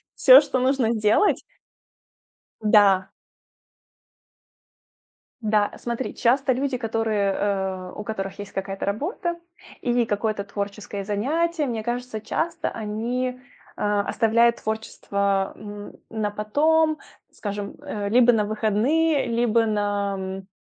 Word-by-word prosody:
Всё, 265 +1 +9
что 265 -3 -1
нужно 255 -3 +2
сделать 215 - +2 1.2
Да. 200 -3 +4 2.3
Да. 210 -1 +2
Смотри, 240 +2 -4
часто 260 +2 +2
люди, 265 +1 -1
которые, 220 -3 0
э, 190 -2 -2
у 210 - -6
которых 195 -3 -5
есть 205 0 -8
какая-то 195 0 -4
работа 340 - -2 0.4
или 240 -1 +1
какое-то 210 -1 -1
творческое 200 0 -5
занятие, 300 - 0
мне 230 -3 -3
кажется, 240 -1 -4
часто 330 +8 -2
они, 230 +4 -2 0.5
э, - - -6 0.3
оставляют 235 +1 +3
творчество, 200 -3 -2
м, 205 0 -9 0.2
на 215 -2 -2
потом, 310 +9 +2 0.3
скажем, 205 -1 -5
э, 210 -8 -4
либо 245 +2 +6
на 215 -2 +2
выходные, 235 +9 +1
либо 235 -1 +2
на, 205 -2 0
м, 190 0 -6
220 Hz, 110 wpm, -24 LUFS, 205-250 Hz, 2.3 s, Всё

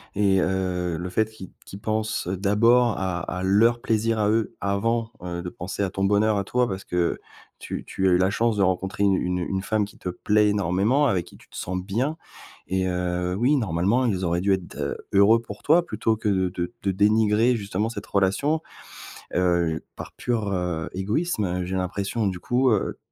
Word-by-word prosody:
Et 95 -2 +3
heu, 90 -2 -1
le 90 +2 -4
fait 110 +3 +1
qu'i 95 -4 -11
qu'ils 100 - -9
pensent 110 -2 -2
d'abord 105 +5 +3
à 95 -2 -2
à 90 +1 -4
leur 115 +5 +4
plaisir 115 0 +1
à 105 -1 +2
eux, 110 -1 0
avant, 110 +3 0
heu, 85 0 -4
de 90 - -4
penser 90 +3 -4
à 95 - -1
ton 95 - -2
bonheur 105 +1 +3
à 100 - 0
toi 125 +4 +1
parce 95 0 -5
que 90 -1 -1 0.4
tu - - -6
tu 95 0 -1
as - - +3
eu - - +5
la 95 +1 +2
chance 115 0 +1
de 100 - +3
rencontrer 95 +2 0
une, 100 -1 +4
heu, - - -2
une 90 0 -1
une 95 +2 -2
femme 105 +1 0
qui 105 - -16
te 90 - -4
plaît 105 +3 +2
énormément, 105 +8 +2
avec 95 -9 +1
qui - - -15
tu - - -21
te - - -17
sens 90 +1 -3
bien. 125 - -2 0.5
Et 95 0 0
heu, 90 0 -1
oui, 130 +7 +3
normalement, 105 +4 +1
ils 95 -4 -1
auraient 85 +1 0
dû 100 0 +3
être, 95 -2 -4
heu, 70 -1 -3 0.2
heureux 100 +4 +6
pour 105 -3 -10
toi 170 +3 +4
plutôt 110 0 0
que 110 - -4
de 95 -2 +1
de 90 +4 -4
de 100 - +1
dénigrer 105 +4 +3
justement 105 +1 -2
cette 105 -4 -7
relation, 100 +12 +1 0.7
heu, 85 -3 +1
par - - -8
pure, 115 -4 -2
heu, 90 -3 -2
égoïsme, 100 - -1
j'ai 95 +1 -3
l'impression. 100 +4 -2
Du 90 -2 -2
coup, 125 +1 +2
heu, 105 - 0
100 Hz, 205 wpm, -24 LUFS, 90-110 Hz, 0.7 s, heureux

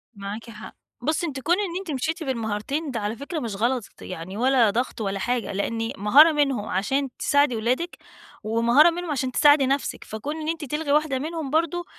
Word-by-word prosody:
معاكِ 205 +3 -7
حق، 215 -3 -11 0.3
بُصّي 310 +6 0
أنتِ 275 -4 -5
كون 330 +6 +2
إن 380 -5 -2
أنتِ 380 -5 -6
مشيتِ 320 +5 -2
بالمهارتين 260 +4 -3
ده 235 - -3
على 210 +1 -3
فكرة 290 +7 -5
مش 230 -7 -4
غلط، 240 +4 0 0.2
يعني 185 +2 -7
ولا 250 -2 +4
ضغط 235 +2 -2
ولا 195 -1 -2
حاجة، 245 +2 -1
لإن 225 +3 -2
مهارة 275 +11 +7
منهم 275 -8 0
عشان 270 +9 0
تساعدي 285 -3 +3
اولادِك 250 +10 -1 0.5
ومهارة 235 +8 +5
منهم 345 -1 -4
عشان 260 -3 -1
تساعدي 290 +1 +5
نفسِك، 275 +1 -1
فكون 220 +8 -5
إن 305 - -5
أنتِ 325 -2 -3
تلغي 300 +2 -2
واحدة 295 -2 +2
منهم 315 0 -4
برضو 335 +3 0
265 Hz, 185 wpm, -24 LUFS, 225-305 Hz, 0.5 s, مهارة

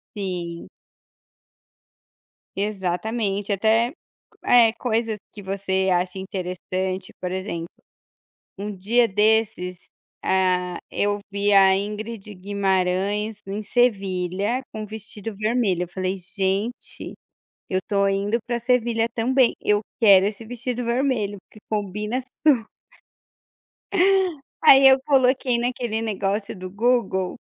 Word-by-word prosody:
Sim. 175 -4 -5 1.9
Exatamente, 200 +1 -2
até, 225 +5 +2 0.5
eh, 235 -2 +6
coisas 225 -2 -1 0.2
que 205 - -10
você 190 0 -1
acha 180 +1 0
interessante, 185 0 -4
por 180 - -3
exemplo, 185 -3 -4 0.9
um 205 0 -4
dia 230 +6 +2
desses, 210 -3 +1 0.4
ah, 180 -1 +1
eu 205 0 0
vi 200 +1 +1
a 195 -1 +6
Ingrid 210 +1 -5
Guimarães 200 +2 0
em 205 +2 -4
Sevilha, 200 -1 0
com 215 - -6
um - - -5
vestido 215 0 -8
vermelho, 215 -4 +1
eu - - -6
falei 185 +1 -2
"gente, 195 +5 -3 0.6
eu 185 - 0
estou 200 -1 +1
indo 200 +4 0
para 240 -1 -1
Sevilha 235 -2 +1
também, 255 +2 +3
eu 210 0 +3 0.2
quero 195 -4 +7
esse 210 +2 -3
vestido 245 +1 -4
vermelho, 235 -4 0
porque 215 - -15
combina 210 +3 -2 0.3
super". 250 -7 +5 2.0
Aí 270 0 +8
eu 265 0 +7
coloquei 260 -3 +2
naquele 240 -2 -2
negócio 200 0 -2
do 185 0 -7
Google, 200 -4 0
205 Hz, 110 wpm, -23 LUFS, 190-230 Hz, 2.0 s, Aí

